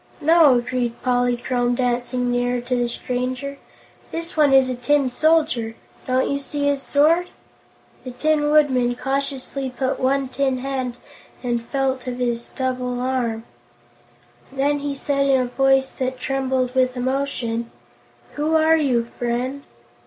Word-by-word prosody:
"No," 315 -3 +6
agreed 245 -1 -1
Polychrome, 245 0 +1
dancing 245 0 -1
nearer 245 0 0
to 245 +1 -2
the 240 -1 0
stranger, 255 +3 -4 0.5
"this 335 +1 -5
one 300 -3 +4
is 265 -1 +6
a 255 - -2
Tin 265 +2 +1
Soldier. 255 -7 +2 0.3
Don't 255 0 +2
you 280 - -1
see 285 +1 -3
his 285 -1 +1
sword?" 320 +6 +3 0.7
The 255 - -6
Tin 295 +3 +1
Woodman 260 -5 +3
cautiously 275 0 -3
put 255 +1 -2
out - - -4
one 270 +1 +1
tin 265 0 0
hand 255 -2 -3 0.5
and 240 -2 -1
felt 265 -2 -1
of 250 -1 -3
his 240 -1 -2
double's 255 -2 -3
arm. 245 -3 -1 1.1
Then 280 +2 0
he 285 0 -3
said 275 0 0
in 270 -1 +4
a 255 - +1
voice 270 +1 +2
that 260 -1 -3
trembled 260 -2 -1
with 255 -1 +1
emotion: 245 -3 -2 0.6
"Who 305 +2 0
are 320 0 +5
you, 255 -6 +1
friend?" 250 +3 -2
260 Hz, 145 wpm, -22 LUFS, 245-280 Hz, 1.1 s, No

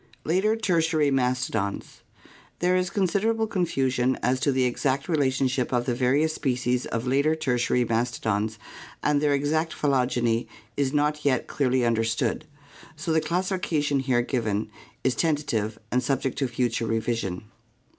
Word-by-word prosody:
Later 190 +7 +2
Tertiary 165 -8 +1
Mastodons. 125 -6 -1 0.6
There 180 +1 +2
is 185 -1 +1
considerable 210 +4 +1
confusion 130 - 0
as 130 +1 +2
to 145 +1 +2
the 130 -1 +1
exact 130 +2 0
relationship 130 -5 +1
of 120 -1 +1
the 125 - 0
various 135 +6 +2
species 125 -3 -1
of 115 +2 -3
later 140 +5 +2
Tertiary 125 -4 +1
mastodons 110 -2 -1 0.5
and 145 -1 +2
their 145 -1 +3
exact 155 +4 0
phylogeny 125 -4 +1 0.3
is 140 -2 0
not 150 +1 0
yet 130 -4 +1
clearly 130 -3 +1
understood, 115 +5 0 0.5
so 155 +1 -2
the 160 - +3
classifica 180 -3 -1
tion 145 -1 +1
here 130 -2 +1
given 110 -4 -2 0.3
is 130 - +2
tentative 135 -10 -1
and 125 - +2
sub 135 +1 0
ject 135 - -1
to 135 - +1
future 120 -2 -1
revision. 110 -4 -2
130 Hz, 145 wpm, -26 LUFS, 120-155 Hz, 0.6 s, their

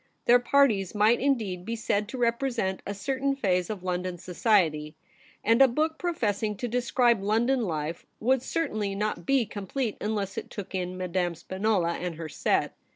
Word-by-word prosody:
Their 245 +1 +6
parties 240 -7 +2
might 215 +3 +4
indeed 220 -10 0
be 230 +4 -3
said 210 -2 -1
to 255 - -6
represent 235 -5 0
a 200 - -2
certain 270 +6 -1
phase 180 -8 0
of 205 -4 -5
London 180 0 -2
society, 175 -4 +1 0.5
and 230 +4 +4
a 270 - +9
book 310 +6 -1
professing 215 - -1
to 245 - -3
describe 240 -2 +2
London 235 +6 +2
life 160 -1 -4
would 255 +3 +2
certainly 215 -11 -2
not 210 +1 -2
be 270 -3 +3
complete 210 +3 -3
unless 205 -2 -2
it - - -11
took 205 -2 -7
in 185 -1 -3
Madame 180 -1 -1
Spinola 190 0 0
and 175 -2 -4
her 160 0 -6
set. - - 0
210 Hz, 165 wpm, -27 LUFS, 185-245 Hz, 0.5 s, a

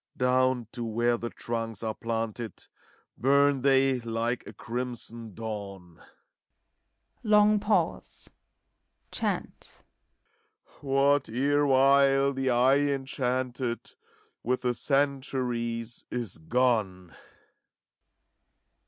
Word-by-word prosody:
Down 130 -1 +2
to 120 - -5
where 120 +1 +1
the 120 0 -4
trunks 115 -3 -4
are 110 -1 -1
planted 115 -2 -4
ACT - - -14 0.5
V, - - -24
233 140 +3 +5
Bum 135 -2 -4
they 135 -1 +3
like 115 +1 -2
a - - -9
crimson 115 -3 -5
dawn. 100 -6 -7 1.2
Long 210 -1 +4
pause. 210 +1 -1 0.8
Chant, - - -4 1.0
What 140 -1 +2
erewhile 140 +1 +3
the 135 0 -1
eye 130 +3 +4
enchanted 130 -3 -2 0.5
With 125 +2 -1
the 125 -1 +1
centuries 125 -4 -1
is 115 -10 -4
gone. 100 -3 0
125 Hz, 90 wpm, -28 LUFS, 115-135 Hz, 1.2 s, 233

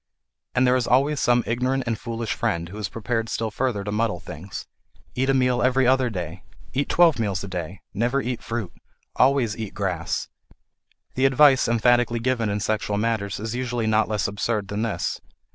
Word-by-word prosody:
And 125 0 +4
there 125 0 +4
is 125 -2 0
always 140 +4 +3
some 120 0 +3
ignorant 125 +4 0
and 115 -1 0
foolish 115 -1 -3
friend 85 0 -1
who 100 - -9
is 105 - -3
prepared 115 0 -2
still 110 -1 -2
further 110 -3 -1
to 105 - -4
muddle 105 -4 0
things: 85 +5 -8 0.5
Eat 130 +2 0
a - - +4
meal 125 -2 +2
every 130 +1 +3
other 130 0 +3
day! 90 -3 -5 0.3
Eat 140 +2 -1
twelve 165 -7 +4
meals 100 -5 -1
a - - -5
day! 90 0 -5
Never 120 +6 +1
eat 125 -2 -3
fruit! 115 -6 -4 0.4
Always 130 -4 +3
eat 110 -3 -6
grass! 90 -4 -2 0.9
The 130 - +1
advice 135 -1 +5
emphatically 120 0 +3
given 115 -2 0
in 100 0 -1
sexual 105 -1 -1
matters 105 -3 -1
is 110 +2 -4
usually 120 -2 -2
not 110 0 +3
less 105 -2 0
absurd 100 0 -2
than 105 +1 -2
this. 105 -7 -2
115 Hz, 185 wpm, -24 LUFS, 105-125 Hz, 0.9 s, advice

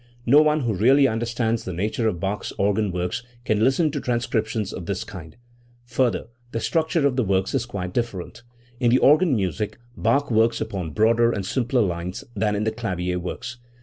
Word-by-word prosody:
No 140 +5 +7
one 155 0 +2
who 120 -4 0
really 135 +8 +5
understands 115 0 -1
the 95 - -5
nature 110 +6 -1
of 90 -6 -1
Bach's 100 +3 -3
organ 100 0 +1
works 90 +4 -2 0.2
can 110 0 +1
listen 150 +5 +3
to 145 -1 -3
transcriptions 115 -4 -1
of 85 - -7
this 100 -2 -2
kind. 85 -4 -10 0.5
Further, 120 0 0 0.3
the 115 - -1
structure 160 +2 +1
of 135 -2 +1
the 130 - +3
works 95 -2 0
is 115 - 0
quite 90 -5 -5
different. 115 -5 -3 0.4
In 120 -2 +3
the 125 - +5
organ 150 +2 +5
music 105 +1 -2 0.2
Bach 125 +5 +1
works 115 +1 +3
upon 100 -6 -3
much 75 - -9
broader 115 +2 +4
and 100 -5 -3
simpler 125 +4 +1
lines 90 +1 -3
than 105 0 0
in 105 - -1
the 110 - 0
clavier 90 -6 -2
works. 120 +7 -6
110 Hz, 190 wpm, -23 LUFS, 95-120 Hz, 0.5 s, No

